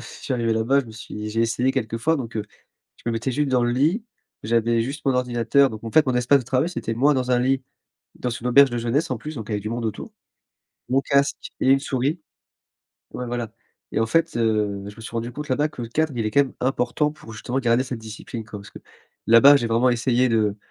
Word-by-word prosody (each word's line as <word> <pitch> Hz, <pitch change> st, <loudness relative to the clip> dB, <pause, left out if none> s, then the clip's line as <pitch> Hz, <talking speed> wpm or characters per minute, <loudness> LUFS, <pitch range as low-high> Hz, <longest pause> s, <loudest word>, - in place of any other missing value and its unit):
Je -, -, -10 dB
suis -, -, -7 dB
arrivé 115 Hz, -2 st, 0 dB
là-bas. 115 Hz, +5 st, +2 dB
Je 125 Hz, -, -10 dB
me -, -, -10 dB
suis 105 Hz, -1 st, -7 dB
j'ai 115 Hz, +1 st, -1 dB
essayé 125 Hz, +3 st, +1 dB
quelquefois. 130 Hz, +5 st, 0 dB
Donc, 115 Hz, -5 st, -6 dB
heu, 105 Hz, -, -1 dB, 0.5 s
je -, -, -22 dB
me 115 Hz, -, 0 dB
mettais 115 Hz, +4 st, -2 dB
juste 145 Hz, +1 st, 0 dB
dans 125 Hz, -2 st, +2 dB
le 120 Hz, -, +1 dB
lit. 160 Hz, -, +1 dB, 0.4 s
J'avais 115 Hz, +1 st, +1 dB
juste 140 Hz, +4 st, -5 dB
mon 135 Hz, -, +3 dB
ordinateur. 125 Hz, +2 st, +2 dB
Donc, 110 Hz, +1 st, -9 dB
en 115 Hz, -, -5 dB
fait, 155 Hz, -1 st, +5 dB
mon 130 Hz, -, +1 dB
espace 125 Hz, +3 st, +4 dB
de -, -, -10 dB
travail 130 Hz, +6 st, +1 dB
c'était 115 Hz, -10 st, -4 dB
moi 145 Hz, +5 st, +3 dB
dans 130 Hz, -1 st, -1 dB
un 125 Hz, -, +4 dB
lit 130 Hz, +1 st, +1 dB, 0.5 s
dans 125 Hz, -, -3 dB
une 120 Hz, +1 st, -4 dB
auberge 140 Hz, +1 st, +6 dB
de 120 Hz, -, -2 dB
jeunesse 120 Hz, +6 st, 0 dB
en 120 Hz, -, -3 dB
plus, 150 Hz, +5 st, -7 dB
donc 110 Hz, -3 st, -6 dB
il -, -, -3 dB
y -, -, +1 dB
avait 105 Hz, -, -1 dB
du 110 Hz, -, -5 dB
monde 120 Hz, 0 st, -3 dB
autour, 110 Hz, -, -5 dB, 0.8 s
mon 130 Hz, +2 st, +3 dB
casque 140 Hz, +1 st, 0 dB
et -, -, +2 dB
une 135 Hz, 0 st, +5 dB
souris 140 Hz, +5 st, -1 dB, 0.9 s
ouais, 125 Hz, -, -4 dB
voilà 120 Hz, -2 st, -4 dB, 0.4 s
et -, -, 0 dB
en 115 Hz, -, +2 dB
fait, 165 Hz, +6 st, +1 dB
heu, 105 Hz, -3 st, 0 dB
je 105 Hz, -, -11 dB
me -, -, -11 dB
suis 115 Hz, -, -7 dB
rendu 115 Hz, +1 st, -3 dB
compte 150 Hz, +2 st, -7 dB
là-bas 145 Hz, +4 st, +1 dB
que 125 Hz, -5 st, -8 dB
le 115 Hz, -, -5 dB
cadre, 155 Hz, +5 st, 0 dB
il 115 Hz, -, -1 dB
est 110 Hz, -, -1 dB
quand 140 Hz, -, +5 dB
même 135 Hz, -, -7 dB
important 130 Hz, +3 st, 0 dB
pour 115 Hz, -7 st, -13 dB
justement 125 Hz, +4 st, -3 dB
garder 120 Hz, +1 st, +2 dB
cette 125 Hz, -2 st, -5 dB
discipline, 110 Hz, +1 st, -8 dB
quoi. 105 Hz, -2 st, -8 dB
Parce 100 Hz, -, -13 dB
que, -, -, -12 dB, 0.5 s
là-bas, 135 Hz, +5 st, +8 dB
j'ai 120 Hz, -, -1 dB
vraiment 120 Hz, +3 st, +3 dB
essayé 125 Hz, +1 st, +2 dB
de 110 Hz, -3 st, +1 dB
125 Hz, 250 wpm, -23 LUFS, 115-135 Hz, 0.9 s, là-bas